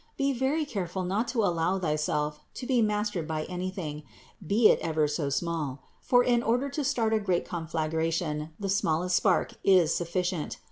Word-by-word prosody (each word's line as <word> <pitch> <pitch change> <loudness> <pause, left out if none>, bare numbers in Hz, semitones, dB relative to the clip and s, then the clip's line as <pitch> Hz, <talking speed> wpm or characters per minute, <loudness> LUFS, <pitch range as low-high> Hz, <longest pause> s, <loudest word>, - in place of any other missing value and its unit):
Be 275 0 +1
very 270 +5 0
careful 190 -7 -3
not 200 +6 -1
to 230 -4 0
allow 175 0 +1
thyself 150 -3 -1 0.2
to 255 - -6
be 250 -2 +2
mastered 210 -6 0
by 155 -1 -2
anything, 180 -4 -5 0.4
be 210 +6 +4
it - - +4
ever 155 -2 +1
so 150 -1 -2
small; 145 -3 -2 0.2
for 245 -1 +4
in 240 -1 +3
order 245 +5 +1
to 285 +2 -3
start 225 -4 +1
a 220 - +3
great 185 -4 0
conflagration 160 -1 -2
the 200 - -3
smallest 180 -2 +1
spark 190 -4 +2
is 180 -5 +5
sufficient. 175 -1 -2
180 Hz, 170 wpm, -28 LUFS, 160-215 Hz, 0.4 s, is